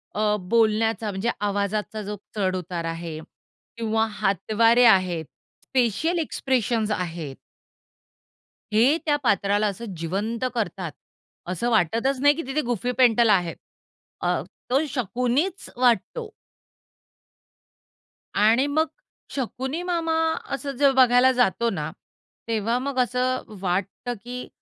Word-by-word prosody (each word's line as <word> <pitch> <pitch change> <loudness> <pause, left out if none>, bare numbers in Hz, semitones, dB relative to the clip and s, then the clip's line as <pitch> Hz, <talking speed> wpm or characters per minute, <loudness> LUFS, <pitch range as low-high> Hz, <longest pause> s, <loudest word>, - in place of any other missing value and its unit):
अ, 210 0 +2
बोलण्याचा 225 -1 +2
म्हणजे 195 +4 -2
आवाजाचा 205 +1 -1
जो 210 +1 -4 0.2
चढ-उतार 185 -4 -2
आहे 165 -1 -5 0.6
किंवा 225 -1 +1
हातवारे 220 +4 +3
आहेत. 185 -6 +4 0.5
फेशियल 270 - +1
एक्सप्रेशन्स 240 -7 0
आहेत. 170 -8 -3 1.4
हे 240 +9 +4
त्या 295 -2 +3
पात्राला 205 -1 +2
असं 205 +1 -5
जिवंत 205 +9 -2
करतात. 185 -7 -2 0.6
असं 185 +7 -1
वाटतच 230 - +1
नाही, 290 +1 +6
की 330 - -4
तिथे 280 +3 0
गुफी 245 -1 -1
पेंटल 235 -2 +5
आहे. 180 -5 +3 0.7
अ, - - +1 0.3
तो 275 +5 +2
शकुनीच 250 - -1
वाटतो. 255 - +1 2.0
आणि 225 +6 +4
मग 310 +3 +1 0.5
शकुनी 265 +4 -3
मामा 335 -2 -1 0.4
असं 275 +1 -3
जेव्हा 270 -2 +6
बघायला 250 +2 +5
जातो 235 -2 +2
ना, 155 -7 -3 0.6
तेव्हा 230 +1 0
मग 265 0 -2
असं 255 +1 +1 0.2
वाटतं, 195 +6 -2
की 250 +1 -6
230 Hz, 110 wpm, -24 LUFS, 200-255 Hz, 2.0 s, नाही